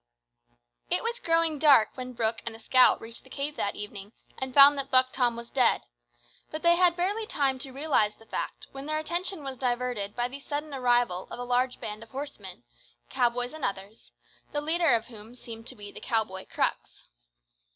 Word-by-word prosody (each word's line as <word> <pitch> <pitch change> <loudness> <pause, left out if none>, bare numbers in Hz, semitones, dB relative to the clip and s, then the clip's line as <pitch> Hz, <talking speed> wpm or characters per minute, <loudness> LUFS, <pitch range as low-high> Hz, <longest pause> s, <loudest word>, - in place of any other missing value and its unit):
It - - +1
was 470 +1 -2
growing 330 - +2
dark 280 -7 +6
when 255 -1 -7
Brooke 225 -1 -1
and 230 -1 -5
the - - -13
scout 255 +3 +5
reached 230 +1 -9
the - - -18
cave 290 +1 -4
that 200 - -1
evening 205 0 -8 0.3
and 265 0 -3
found 280 +2 +8
that 275 - -3
Buck 255 0 +4
Tom 245 -3 +1
was 235 0 -9
dead; 260 -2 +3 0.7
but 310 - -6
they 340 0 +6
had 350 -1 +4
barely 405 +5 -1
time 270 -6 0
to 270 0 -4
realise 270 -7 +1
the 225 - -19
fact - - -5
when 270 +1 -8
their 310 0 0
attention 345 +1 -2
was 270 -1 -6
diverted 245 -5 -2
by 240 0 0
the 270 +3 -9
sudden 290 +1 -5
arrival 245 -8 +1
of - - -7
a 245 - -5
large 250 +1 0
band 210 0 -6
of 230 - -12
horsemen 220 -8 -7 0.5
cowboys 245 +1 0
and 315 -3 -9
others 200 +2 -5 0.4
the 295 - 0
leader 325 +2 +1
of 230 0 -2
whom 225 0 -12
seemed 225 -2 -10
to 260 - -4
be 205 -2 -10
the - - -10
cow 225 -2 +2
boy 190 -2 -9
Crux. - - -2
255 Hz, 200 wpm, -28 LUFS, 225-295 Hz, 0.7 s, found